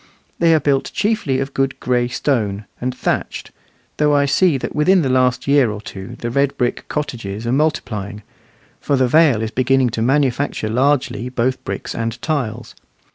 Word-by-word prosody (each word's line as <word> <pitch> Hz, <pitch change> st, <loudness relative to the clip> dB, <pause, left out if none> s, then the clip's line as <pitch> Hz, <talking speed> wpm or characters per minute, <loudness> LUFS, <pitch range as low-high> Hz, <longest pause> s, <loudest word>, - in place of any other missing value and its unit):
They 165 Hz, -1 st, +5 dB
are -, -, +3 dB
built 140 Hz, -1 st, 0 dB
chiefly 205 Hz, -11 st, 0 dB
of 135 Hz, 0 st, -4 dB
good 135 Hz, 0 st, -1 dB
gray 125 Hz, -1 st, +1 dB
stone, 110 Hz, -6 st, -1 dB, 0.2 s
and 125 Hz, +1 st, -3 dB
thatched; -, -, -2 dB, 0.5 s
though 150 Hz, -1 st, +3 dB
I 140 Hz, 0 st, +3 dB
see 145 Hz, +2 st, +3 dB
that -, -, -5 dB
within 180 Hz, +4 st, +4 dB
the 130 Hz, -, 0 dB
last 125 Hz, 0 st, +1 dB
year 140 Hz, -4 st, +4 dB
or 105 Hz, 0 st, -5 dB
two 95 Hz, -2 st, -9 dB
the 120 Hz, -, -3 dB
red 140 Hz, +2 st, +1 dB
brick 120 Hz, -1 st, -1 dB
cottages 115 Hz, -7 st, -4 dB
are 120 Hz, -, 0 dB
multiplying, 110 Hz, -8 st, -1 dB, 0.6 s
for 140 Hz, -, 0 dB
the 130 Hz, -1 st, +2 dB
Vale 135 Hz, -5 st, +4 dB
is 110 Hz, -, -3 dB
beginning 130 Hz, 0 st, +2 dB
to 110 Hz, -, -3 dB
manufacture 135 Hz, -2 st, 0 dB
largely 125 Hz, 0 st, +1 dB
both 130 Hz, +1 st, -1 dB
bricks -, -, -5 dB
and 115 Hz, 0 st, -3 dB
tiles. 130 Hz, -9 st, -3 dB
130 Hz, 175 wpm, -19 LUFS, 115-145 Hz, 0.6 s, They